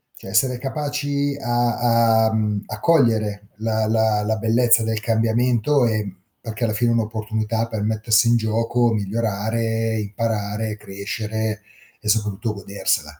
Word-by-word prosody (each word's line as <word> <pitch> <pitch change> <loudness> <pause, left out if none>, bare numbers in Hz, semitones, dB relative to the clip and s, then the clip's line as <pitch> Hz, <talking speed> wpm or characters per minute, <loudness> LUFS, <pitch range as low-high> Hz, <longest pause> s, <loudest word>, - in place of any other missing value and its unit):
cioè - - -11
essere 125 +5 +2
capaci 145 +1 -2
a 120 -1 +2
a, 110 - -1
mhmm, 105 -2 0
a 110 - -6
cogliere 110 -9 +2
la 110 0 -1
la 110 -1 +2
la 110 +1 0
bellezza 115 +1 +3
del 110 -1 -1
cambiamento 115 +4 +2
e 105 -4 -2 0.3
perché 115 +1 -4
alla 110 - -1
fine 120 +2 +1
è - - +2
un'opportunità 110 0 -1
per 110 -2 -4
mettersi 110 +2 +2
in 120 0 +4
gioco, 115 +2 +1
migliorare, 110 +2 -1
imparare, 105 0 -2
crescere 105 +2 -4 0.4
e 110 - -9
soprattutto 105 0 0
godersela. 100 -7 -2
110 Hz, 135 wpm, -21 LUFS, 105-115 Hz, 0.4 s, in